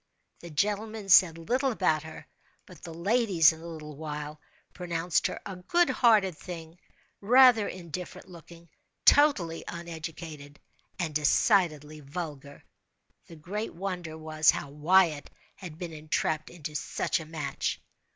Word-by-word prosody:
The 170 Hz, -, -10 dB
gentlemen 210 Hz, +5 st, -2 dB
said 175 Hz, -3 st, +6 dB
little 255 Hz, +11 st, 0 dB
about 170 Hz, -8 st, +1 dB
her; 160 Hz, +1 st, -10 dB, 0.4 s
but 180 Hz, -4 st, -15 dB
the 170 Hz, -, -8 dB
ladies, 180 Hz, -2 st, +3 dB
in 160 Hz, -, -13 dB
a 170 Hz, -, -9 dB
little 155 Hz, -3 st, -9 dB
while, 150 Hz, 0 st, -6 dB, 0.3 s
pronounced 175 Hz, -1 st, -1 dB
her -, -, -6 dB
"a 195 Hz, -3 st, -7 dB
good 340 Hz, -, +2 dB
hearted 215 Hz, -8 st, +3 dB
thing, 165 Hz, 0 st, -9 dB, 0.4 s
rather 245 Hz, 0 st, +6 dB
indifferent 180 Hz, 0 st, -7 dB
looking, 170 Hz, -1 st, -14 dB, 0.4 s
totally 200 Hz, -, +4 dB
uneducated, 160 Hz, -3 st, -8 dB, 0.4 s
and 160 Hz, -3 st, -3 dB
decidedly 155 Hz, -1 st, +2 dB
vulgar." 145 Hz, -1 st, -8 dB, 0.6 s
The 165 Hz, -, -12 dB
great 195 Hz, +8 st, -5 dB
wonder 175 Hz, -3 st, -5 dB
was, 155 Hz, -1 st, +1 dB
how 140 Hz, -, +1 dB
Wyatt 155 Hz, 0 st, +2 dB, 0.2 s
had 170 Hz, -5 st, -10 dB
been 170 Hz, -1 st, -6 dB
entrapped 155 Hz, 0 st, -2 dB
into 155 Hz, -3 st, -8 dB
such 150 Hz, -, -1 dB
a 160 Hz, -, -8 dB
match. 150 Hz, -4 st, -3 dB
170 Hz, 130 wpm, -28 LUFS, 155-190 Hz, 0.6 s, said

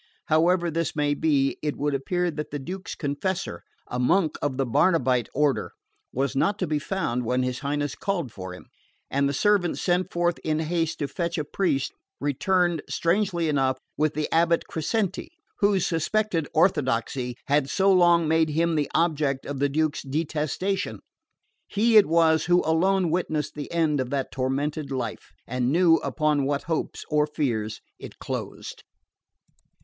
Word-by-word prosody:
However 170 Hz, +2 st, +3 dB
this 165 Hz, 0 st, -2 dB
may 145 Hz, -1 st, +1 dB
be, 145 Hz, -3 st, +1 dB
it 150 Hz, -1 st, -2 dB
would 145 Hz, 0 st, -1 dB
appear 175 Hz, +6 st, 0 dB
that 150 Hz, -1 st, -5 dB
the 145 Hz, -, -4 dB
Duke's 180 Hz, +7 st, -6 dB
confessor 170 Hz, +6 st, -3 dB, 0.2 s
a 125 Hz, -, -4 dB
monk 165 Hz, +6 st, +2 dB
of 140 Hz, -3 st, -1 dB
the 135 Hz, -, +1 dB
Barnabite 130 Hz, -, +2 dB
order 145 Hz, -1 st, 0 dB, 0.4 s
was 135 Hz, +1 st, -1 dB
not 200 Hz, +9 st, +1 dB
to 185 Hz, -, -1 dB
be 155 Hz, -2 st, -1 dB
found 145 Hz, -8 st, -2 dB
when 125 Hz, +2 st, 0 dB
his 125 Hz, 0 st, -2 dB
Highness 145 Hz, 0 st, -2 dB
called 175 Hz, -, -2 dB
for 95 Hz, -3 st, -7 dB
him; 90 Hz, -, -11 dB, 0.5 s
and 140 Hz, 0 st, +2 dB
the -, -, 0 dB
servant 185 Hz, +4 st, +2 dB
sent 180 Hz, +1 st, 0 dB
forth 175 Hz, 0 st, 0 dB
in 155 Hz, -1 st, 0 dB
haste 165 Hz, 0 st, -1 dB
to 145 Hz, -, -2 dB
fetch 170 Hz, +3 st, -3 dB
a 155 Hz, -, 0 dB
priest 145 Hz, -3 st, -1 dB, 0.3 s
returned, 175 Hz, +3 st, +1 dB
strangely 170 Hz, -1 st, +1 dB
enough, 135 Hz, -3 st, +1 dB, 0.2 s
with 155 Hz, +1 st, 0 dB
the 155 Hz, 0 st, -1 dB
abate 170 Hz, 0 st, +3 dB
Crescenti, 195 Hz, -, -2 dB, 0.3 s
whose 200 Hz, -3 st, +3 dB
suspected 170 Hz, 0 st, 0 dB
orthodoxy 130 Hz, -6 st, +1 dB
had 145 Hz, -1 st, +1 dB
so 195 Hz, +4 st, +3 dB
long 175 Hz, -2 st, +5 dB
made 160 Hz, 0 st, +3 dB
him 165 Hz, +2 st, +1 dB
the 150 Hz, -3 st, 0 dB
object 150 Hz, -5 st, +1 dB
of 145 Hz, -2 st, -5 dB
the 140 Hz, 0 st, +2 dB
Duke's 155 Hz, +1 st, 0 dB
detestation. 155 Hz, +6 st, -2 dB, 0.7 s
He 225 Hz, +3 st, +2 dB
it 210 Hz, -2 st, +8 dB
was 160 Hz, -1 st, +3 dB
who 175 Hz, +1 st, +3 dB
alone 175 Hz, +2 st, +2 dB
witnessed 155 Hz, -3 st, -1 dB
the 145 Hz, -2 st, -7 dB
end 160 Hz, -4 st, +1 dB
of 130 Hz, -1 st, -2 dB
that 135 Hz, -1 st, -2 dB
tormented 140 Hz, +3 st, -2 dB
life, 130 Hz, -2 st, -4 dB
and 125 Hz, +1 st, -1 dB
knew 165 Hz, 0 st, +5 dB
upon 150 Hz, -4 st, 0 dB
what 140 Hz, 0 st, -1 dB
hopes 165 Hz, 0 st, -3 dB
or 150 Hz, -1 st, +2 dB
fears 115 Hz, -8 st, -2 dB, 0.2 s
it -, -, -10 dB
closed. -, -, -6 dB
155 Hz, 165 wpm, -25 LUFS, 140-175 Hz, 0.7 s, it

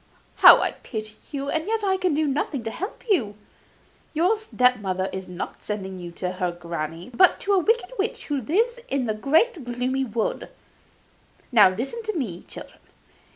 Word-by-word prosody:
How -, -, +10 dB
I -, -, +1 dB
pity 215 Hz, -2 st, -7 dB, 0.2 s
you; 280 Hz, 0 st, -3 dB
and 320 Hz, +2 st, -1 dB
yet 445 Hz, 0 st, -1 dB
I 385 Hz, -1 st, +2 dB
can 370 Hz, -5 st, 0 dB
do 310 Hz, +1 st, +1 dB
nothing 275 Hz, -2 st, -1 dB
to 225 Hz, -, -4 dB
help 390 Hz, -, -6 dB
you! 240 Hz, -, +1 dB, 0.8 s
Your 355 Hz, +7 st, +3 dB
step 250 Hz, -, +2 dB
mother 190 Hz, -1 st, -2 dB
is 190 Hz, 0 st, -5 dB
not 180 Hz, 0 st, -6 dB
sending 190 Hz, -3 st, -5 dB
you 175 Hz, -1 st, -7 dB
to 180 Hz, +1 st, -3 dB
her 180 Hz, -1 st, -2 dB
granny, 170 Hz, +2 st, -6 dB
but 370 Hz, +8 st, +5 dB
to 405 Hz, -, +1 dB
a 390 Hz, -, +5 dB
wicked 450 Hz, +2 st, +1 dB
witch 410 Hz, +3 st, -2 dB
who 285 Hz, -3 st, -2 dB
lives 455 Hz, -, +1 dB
in 270 Hz, -2 st, -1 dB
that 215 Hz, -1 st, -3 dB
great 320 Hz, -, +2 dB
gloomy 250 Hz, +2 st, -1 dB
wood. 225 Hz, -2 st, -2 dB, 1.0 s
Now 210 Hz, -6 st, +7 dB
listen 250 Hz, -, -4 dB
to 430 Hz, -4 st, -3 dB
me, 190 Hz, -, -3 dB
children. -, -, -12 dB
255 Hz, 180 wpm, -24 LUFS, -, 1.0 s, How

